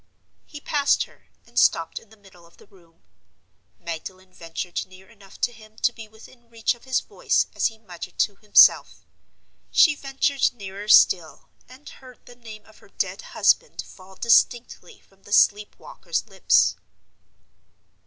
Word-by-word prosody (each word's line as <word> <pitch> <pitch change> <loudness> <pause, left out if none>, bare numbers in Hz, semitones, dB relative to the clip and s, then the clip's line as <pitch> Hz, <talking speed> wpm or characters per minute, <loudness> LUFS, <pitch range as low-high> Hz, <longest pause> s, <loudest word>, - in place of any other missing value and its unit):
He 295 - -10
passed 290 -1 +1
her, - - -20 0.2
and - - -2
stopped - - +1
in 225 - -23
the 220 - -20
middle 185 -4 -20
of 170 - -25
the - - -19
room. 170 -5 -25 0.8
Magdalen 185 +3 -9
ventured 170 +1 -6
near 185 +1 -17
enough 200 -4 -18
to 245 - +1
him 215 -1 -18
to 240 - 0
be 225 -2 -11
within 230 +2 -19
reach 230 -1 -1
of 240 - -20
his 260 -1 0
voice - - -1
as - - +1
he 225 - -10
muttered 185 -6 -11
to 205 - 0
himself. 210 -1 +4 0.6
She 315 - +5
ventured 275 -1 -1
nearer 200 -2 -9
still, 175 -6 +3 0.2
and 260 +3 -16
heard 255 -2 -15
the 245 - -14
name 220 -3 -13
of 220 - -21
her - - -21
dead - - -4 0.2
husband - - +1
fall 190 0 -16
distinctly 235 -3 0
from 195 0 -30
the 205 - -16
sleep 205 0 +3
walker's - - -5
lips. - - +2
215 Hz, 160 wpm, -23 LUFS, 190-240 Hz, 0.8 s, She